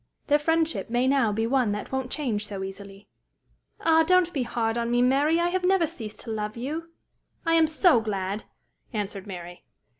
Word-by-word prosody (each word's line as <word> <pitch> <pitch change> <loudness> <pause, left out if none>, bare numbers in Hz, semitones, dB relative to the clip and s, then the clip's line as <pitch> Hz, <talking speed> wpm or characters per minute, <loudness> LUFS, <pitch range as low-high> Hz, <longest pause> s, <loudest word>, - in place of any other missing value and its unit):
Their 295 0 +3
friendship 325 -1 0
may 245 +2 +1
now 265 -5 +3
be 220 +2 0
one 245 -3 +2
that 210 - -5
won't 265 -1 -2
change 230 -9 -2
so 195 -2 -5
easily." 195 +1 -9 0.7
"Ah! 325 0 +4
don't 355 +1 +3
be 275 - -1
hard 230 -2 -1
on 235 0 -1
me, 240 0 +2
Mary. 285 +6 +3
I 345 0 +2
have 370 +1 -1
never 370 -2 +3
ceased 225 -10 -8
to 230 - -7
love 215 0 -3
you." 310 +7 -4 0.6
"I 330 - +2
am 325 -1 +5
so 310 - +4
glad!" 200 -1 -3 0.5
answered 205 -2 -4
Mary. 175 -2 -8
245 Hz, 185 wpm, -26 LUFS, 210-320 Hz, 0.7 s, am